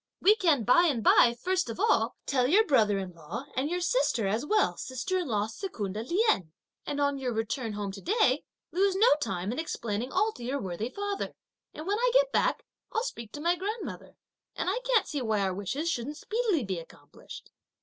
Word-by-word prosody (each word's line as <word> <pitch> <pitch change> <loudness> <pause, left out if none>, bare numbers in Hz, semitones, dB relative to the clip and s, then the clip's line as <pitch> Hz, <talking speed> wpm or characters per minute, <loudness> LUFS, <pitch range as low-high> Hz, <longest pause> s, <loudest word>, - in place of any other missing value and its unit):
"We 415 +3 +6
can 325 - +2
by 345 +10 +5
and 250 -8 0
by 235 +3 +6
first 370 -2 0
of 230 - -6
all, 225 +1 +2
tell 255 -2 +2
your 410 +10 +5
brother 215 -8 +3
in 190 -2 -5
law, 170 - -7
and 265 +3 0
your 355 +1 -1
sister 350 - +1
as 215 +6 0
well 425 +7 +2
as - - -9
sister 260 +9 -2
in 350 - -3
law 210 -4 0
Secunda 220 - -5
Lien; 335 - +1 0.4
and 290 -1 -2
on 285 -1 +1
your 255 -2 -2
return 225 +1 -2
home 205 -1 -3
to 195 0 -9
day, 345 - +2 0.3
lose 385 +2 +2
no 410 +4 +4 0.2
time 185 -6 -2
in 250 - -3
explaining 235 -6 -3
all 440 +1 +2
to 245 - -11
your 265 +4 -2
worthy 195 +2 -4
father, 405 +6 -4 0.4
and 310 - -7
when 405 +3 0
I - - +3
get - - +4
back, - - +1 0.3
I'll 450 - 0
speak 235 - -6
to 295 - -6
my 345 +2 +2
grandmother; 410 +5 -5 0.4
and 370 - -1
I 455 - -1
can't - - +3
see 290 -3 -3
why 220 -4 0
our 190 -1 0
wishes 220 - -3
shouldn't 285 +2 -4
speedily 425 - 0
be 190 -4 -3
accomplished." 145 -3 -13
270 Hz, 210 wpm, -29 LUFS, -, 0.4 s, We